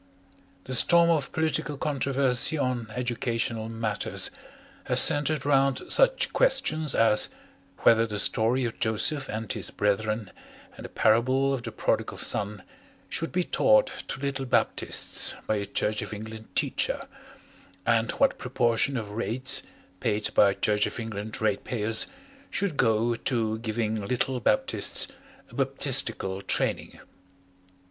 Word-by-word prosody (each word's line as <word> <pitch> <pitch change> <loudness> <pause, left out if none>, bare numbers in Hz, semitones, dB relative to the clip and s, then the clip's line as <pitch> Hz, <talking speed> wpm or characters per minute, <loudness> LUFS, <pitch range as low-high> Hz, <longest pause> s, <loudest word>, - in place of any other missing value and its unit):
The 130 - -6
storm 170 +5 +5
of 150 -5 0
political 155 -2 -1
controversy 140 -1 +1
on 125 -4 -2
educational 115 -2 -2
matters 115 -3 0 0.5
has - - +3
centred 145 -1 +4
round 135 -2 +2
such - - +3
questions 155 - +2
as 110 -2 +4 0.5
whether 115 0 +5
the 105 -1 -4
story 115 +5 +2
of 115 - -5
Joseph 135 +6 0
and 110 -1 -4
his - - -3
Brethren 105 +1 -1 0.4
and - - -10
the - - -7
Parable 130 +5 +2
of 130 - -2
the 120 -1 -6
Prodigal - - -1
Son 105 -2 -1 0.5
should 165 - -3
be 180 - 0
taught - - +3 0.2
to - - -5
little 135 -1 -3
Baptists - - +2
by 110 - 0
a 100 0 -4
Church 105 +1 -1
of - - -6
England 110 +1 -9
teacher, - - -1 0.8
and 115 0 +2
what 275 - +1
proportion 125 +1 0
of 105 -3 -5
rates 115 +4 -2 0.4
paid 105 -3 -1
by 100 -1 +4
Church 105 -1 +1
of - - -6
England 110 -1 -5
ratepayers 110 +1 0 0.4
should 195 -6 -1
go 115 -1 +2
to 115 -2 -1
giving 110 -2 -2
little 125 +4 -1
Baptists 110 - 0 0.4
a - - -17
Baptistical 95 0 +1
training. - - -2
115 Hz, 130 wpm, -26 LUFS, 110-135 Hz, 0.8 s, storm